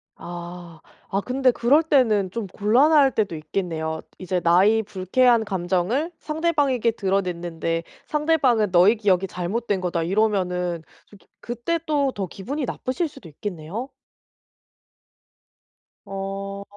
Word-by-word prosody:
아, 175 -1 -9 0.3
아 195 +1 0
근데 255 +3 +2
그럴 260 +7 +4
때는 225 - +2
좀 230 -2 -4
곤란할 265 - +4
때도 205 -6 0
있겠네요. 160 0 -3 0.2
이제 185 -1 -1
나의 195 +6 +4
불쾌한 220 +4 +2
감정을 190 - -1
상대방에게 295 -7 +1
드러냈는데 175 -5 -2 0.2
상대방은 290 -9 +2
"너의 190 +6 +5
기억이 195 -3 +2
잘못된 190 +3 -2
거다." 170 -2 -1
이러면은 180 -3 0 0.2
좀 205 - -17
기 - - -28
그때 240 +8 -2
또 285 -3 +1
더 195 -2 -3
기분이 265 - -4
나쁘실 315 +9 -2
수도 250 - -13
있겠네요. 185 - -6 2.2
어. 195 0 -5
200 Hz, 270 characters per minute, -23 LUFS, 180-255 Hz, 2.2 s, 너의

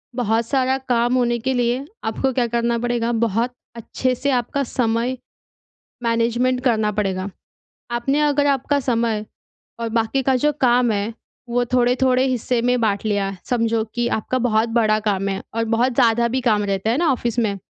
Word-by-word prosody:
बहुत 230 -1 0
सारा 265 -1 +1
काम 240 0 +2
होने 240 -1 +1
के 260 +3 -1
लिए 245 +2 0 0.2
आपको 260 +4 -1
क्या 245 -1 +1
करना 235 0 0
पड़ेगा 240 -1 -1
बहुत 230 +1 0 0.2
अच्छे 255 +2 -2
से 280 +3 -1
आपका 255 +3 0
समय 240 0 -1 0.9
मैनेजमेंट 235 +2 +1
करना 220 -4 +2
पड़ेगा। 195 -2 -2 0.6
आपने 240 +5 0
अगर 290 -1 +2
आपका 280 +1 +1
समय 230 -4 0 0.6
और 230 - -2
बाकी 230 +4 0
का 265 0 +2
जो 295 +4 +2
काम 245 -2 +4
है 205 +2 -2 0.4
वो 245 +1 +1
थोड़े-थोड़े 255 +1 +2
हिस्से 250 -2 0
में 245 0 +1
बाँट 205 -1 0
लिया, 200 -2 -1
समझो 230 -2 0
कि 240 0 0
आपका 235 +4 -1
बहुत 230 -2 +1
बड़ा 220 -2 +2
काम 195 0 -1
है 195 - -3
और 230 - 0
बहुत 245 +2 +1
ज़्यादा 235 -2 +3
भी 255 +2 -1
काम 215 -4 +2
रहता 195 +1 -1
है 240 - +1
ना 330 -4 +2
ऑफ़िस 240 -2 -1
में? 210 -4 0
235 Hz, 175 wpm, -21 LUFS, 225-255 Hz, 0.9 s, काम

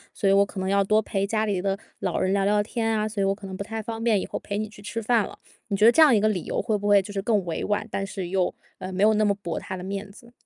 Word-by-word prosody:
所 200 - 0
以 195 - +5
我 200 0 +6
可 200 -1 -6
能 190 - -2
要 200 +1 +3
多 215 +2 +3
陪 200 -2 -2
家 215 +1 0
里 200 -4 -1
的 195 0 -1 0.2
老 - - -1
人 185 - +1
聊 200 -1 +2
聊 205 +1 +3
天 225 +1 -2
啊， 215 0 0
所 215 -2 -3
以 - - +2
我 195 0 +1
可 205 0 -11
能 190 -1 -6
不 200 - -4
太 225 +2 -5
方 225 +1 -5
便 225 -4 +3
以 - - -3
后 - - -5
陪 200 - -4
你 215 +1 -2
去 205 -1 -14
吃 210 +3 -4
饭 230 0 +2
了。 - - -12 0.3
你 200 -3 -1
觉 210 - +4
得 230 - +9
这 320 - +4
样 295 -6 +7
一 - - +4
个 215 - +2
理 195 -6 -1
由 - - -2
会 220 - 0
不 205 0 -3
会 205 -1 +6
就 205 - -9
是 195 - -2
更 205 -2 +1
委 170 - -3
婉， 205 +1 -1
但 195 - -2
是 195 -2 -5
又， 185 -1 0 0.3
呃， 185 - -6
没 190 +2 0
有 215 +1 +6
那 215 0 +2
么 200 -1 +2
驳 170 -2 -3
他 190 - -6
的 180 - -7
面 195 +2 -5
子？ 235 +3 -16
205 Hz, 365 characters per minute, -25 LUFS, 195-215 Hz, 0.3 s, 得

